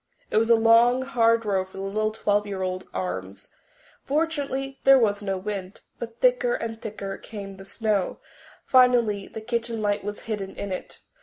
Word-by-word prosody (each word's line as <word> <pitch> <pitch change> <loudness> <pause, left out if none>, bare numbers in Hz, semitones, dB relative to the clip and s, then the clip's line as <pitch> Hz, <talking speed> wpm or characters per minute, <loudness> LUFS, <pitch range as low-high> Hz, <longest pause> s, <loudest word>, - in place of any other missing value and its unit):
It - - +2
was 225 +1 +3
a 230 - +8
long, 230 +3 +5
hard 230 -3 +2
row 195 -2 +1
for 190 +1 -14
the 195 - -4
little 215 +2 0
twelve 210 -1 0
year 195 -2 -3
old 185 0 -3
arms. 95 +1 -5 0.5
Fortunately 280 -3 -1
there 270 0 +8
was 210 -5 +2
no 195 -2 -2
wind. 195 0 -5 0.2
But 230 -1 -7
thicker - - +3
and 225 - -5
thicker 200 -2 -6
came 200 -3 -8
the 195 - -11
snow; 205 -1 -1 0.5
finally 240 -6 +4
the 220 - -8
kitchen 235 0 -2
light 205 -1 0
was 205 +1 -5
hidden 205 -4 -5
in 200 - -5
it. 185 - -6
215 Hz, 175 wpm, -25 LUFS, 195-235 Hz, 0.5 s, a